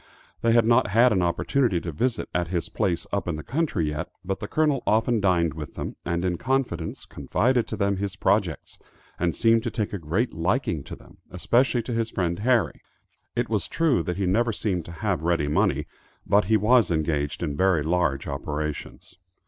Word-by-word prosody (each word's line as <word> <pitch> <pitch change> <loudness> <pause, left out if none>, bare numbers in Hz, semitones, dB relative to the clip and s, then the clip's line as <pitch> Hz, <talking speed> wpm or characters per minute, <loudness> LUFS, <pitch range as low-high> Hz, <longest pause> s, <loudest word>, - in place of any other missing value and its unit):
They 115 0 +3
had 115 -1 +5
not 120 +1 +4
had 115 +5 +4
an 95 -4 +2
opportunity 95 +4 +1
to 85 - -4
visit 120 - -1
at 85 -1 0
his 85 -1 -2
place 95 -6 -1
"up 100 - -1
in 85 - -1
the 75 - -6
country" 130 - -1
yet, 75 0 -4 0.2
but 95 +1 -2
the 105 - -5
Colonel 150 0 +1
often 110 +2 +2
dined 85 -4 +2
with 75 -2 -8
them, - - -5
and 85 +1 -1
in 90 -2 -1
confidence, 130 -11 -2
confided 125 0 0
to - - -5
them 100 -1 +1
his 100 0 -3
projects, 100 -5 0 0.4
and 85 -1 0
seemed 115 0 +4
to 120 - -2
take 105 -2 -3
a 100 - -3
great 85 +10 -1
liking 85 - -1
to - - -7
them, - - -19
especially 120 +6 +1
to 120 - -4
his 115 0 -1
friend 85 -4 -2
Harry. 120 0 +1 0.5
It - - 0
was - - -1
true 160 - +2
that 90 +2 -3
he 100 - 0
never 115 +6 +2
seemed 95 -6 -2
to - - -9
have 95 -6 +1
ready 85 -3 +1
money, 75 - +1 0.4
but 100 0 +3
he 110 +3 +3
was 115 +3 +4
engaged 80 -1 -1
in 75 -4 -2
very 90 -2 +2
large 80 -4 0
operations. 75 +5 -5
95 Hz, 195 wpm, -25 LUFS, 85-115 Hz, 0.5 s, had